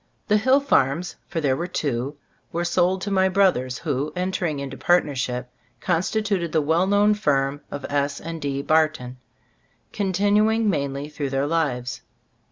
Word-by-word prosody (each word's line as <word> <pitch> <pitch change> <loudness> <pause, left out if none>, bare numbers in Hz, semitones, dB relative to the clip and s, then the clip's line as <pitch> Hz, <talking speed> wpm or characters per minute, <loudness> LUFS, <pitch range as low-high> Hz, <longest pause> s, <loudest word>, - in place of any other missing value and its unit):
The 210 - +5
hill 260 +6 +4
farms 175 - +1
— - - -43
for 170 - -2
there 140 -4 +1
were 170 +5 -3
two 140 -4 -2 0.2
— - - -41
were 170 +1 -2
sold 180 +2 +1
to 200 - -3
my 190 -1 +3
brothers, 180 -11 +2
who, 145 -1 -2
en 180 +1 -1
tering 170 -5 -1
into 135 -1 -5
partnership, 130 -5 0 0.3
constituted 185 - 0
the 160 - +2
well 165 +5 +2
known 205 +1 +4
firm 145 -7 0
of 145 - -6
S. 145 0 -1
& 165 -1 -5
D. 140 -2 -3
Barton, 155 -5 +1 0.8
continuing 210 +3 +2
mainly 140 -5 -1
through 150 -2 -4
their 135 +1 0
lives. 140 -6 -1
160 Hz, 165 wpm, -23 LUFS, 140-190 Hz, 0.8 s, The